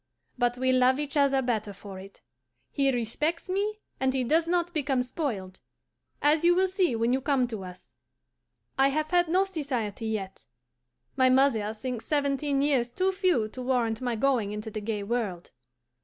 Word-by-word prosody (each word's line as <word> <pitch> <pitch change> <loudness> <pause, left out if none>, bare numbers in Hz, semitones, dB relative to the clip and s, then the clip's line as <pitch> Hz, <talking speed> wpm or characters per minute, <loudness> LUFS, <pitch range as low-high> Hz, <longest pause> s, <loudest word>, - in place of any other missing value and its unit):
But 245 -1 0
we 260 +1 +2
love 255 +1 +4
each 295 -1 -4
other 275 -2 +3
better 215 -4 -1
for 195 -1 -10
it; 195 +1 -13 0.5
he 275 -2 +2
respects 265 - -2
me, 415 +3 -2 0.2
and 265 0 +1
he 260 - +1
does 320 +7 +2
not 345 0 0
become 275 -5 0
spoiled, 225 - -4 0.6
as 300 +2 +4
you 350 0 +5
will 375 +1 +3
see 370 - +1
when 230 +2 +1
you 265 - +1
come 265 -3 +1
to 215 -5 -5
us. 180 0 -12 0.9
I 270 - +6
have 305 +3 -1
had 350 -1 +3
no 365 +4 +3
society 255 - -3
yet. 200 -4 -4 0.7
My 260 -1 +4
mother 255 -5 +3
thinks 240 +1 -5
seventeen 280 -1 +1
years 265 -5 +2
too 375 +10 0
few 365 - +1
to 255 - -8
warrant 245 -3 0
my 245 -2 -1
going 230 -4 +1
into 210 +1 -5
the 215 - -5
gay 210 -1 -3
world. 200 -6 -3
260 Hz, 175 wpm, -27 LUFS, 225-300 Hz, 0.9 s, I